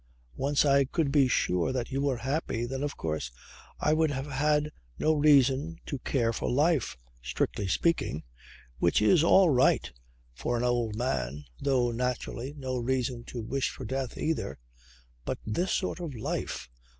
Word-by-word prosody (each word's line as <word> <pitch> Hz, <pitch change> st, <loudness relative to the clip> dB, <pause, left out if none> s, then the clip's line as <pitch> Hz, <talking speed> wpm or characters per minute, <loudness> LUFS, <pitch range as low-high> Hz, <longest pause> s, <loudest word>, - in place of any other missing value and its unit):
Once 145 Hz, +1 st, +2 dB
I 140 Hz, -1 st, +4 dB
could 145 Hz, +1 st, 0 dB
be 140 Hz, -2 st, +5 dB
sure 90 Hz, -7 st, +1 dB
that 130 Hz, 0 st, -3 dB
you 135 Hz, +1 st, -1 dB
were 140 Hz, -3 st, +1 dB
happy 130 Hz, -2 st, -2 dB
then 135 Hz, +2 st, -4 dB
of 145 Hz, 0 st, -3 dB
course 80 Hz, -5 st, -3 dB, 0.5 s
I 150 Hz, -, +2 dB
would 160 Hz, 0 st, +3 dB
have 135 Hz, -1 st, -3 dB
had 150 Hz, +2 st, +1 dB, 0.3 s
no 155 Hz, -, +2 dB
reason 145 Hz, +1 st, +4 dB
to 140 Hz, -, -4 dB
care 120 Hz, -3 st, 0 dB
for -, -, -2 dB
life 145 Hz, +1 st, +2 dB, 0.2 s
strictly 65 Hz, -, -2 dB
speaking 95 Hz, -, 0 dB, 0.6 s
which 85 Hz, -, +3 dB
is 155 Hz, -, +5 dB
all 180 Hz, 0 st, +6 dB
right 125 Hz, -, +3 dB, 0.4 s
for 120 Hz, -, -2 dB
an 120 Hz, -, -1 dB
old 120 Hz, -3 st, 0 dB
man; 75 Hz, -, -2 dB, 0.2 s
though 130 Hz, -3 st, +2 dB
naturally... 125 Hz, +1 st, -3 dB
no 130 Hz, -2 st, -3 dB
reason 125 Hz, -1 st, -1 dB
to 120 Hz, -3 st, -6 dB
wish 135 Hz, +4 st, -1 dB
for -, -, -8 dB
death 130 Hz, -1 st, -3 dB
either. 160 Hz, 0 st, -2 dB, 0.7 s
But -, -, -3 dB
this 175 Hz, -, -1 dB
sort 185 Hz, -, -1 dB
of 165 Hz, -6 st, -5 dB
life! 110 Hz, -, -3 dB
130 Hz, 160 wpm, -29 LUFS, 120-145 Hz, 0.7 s, all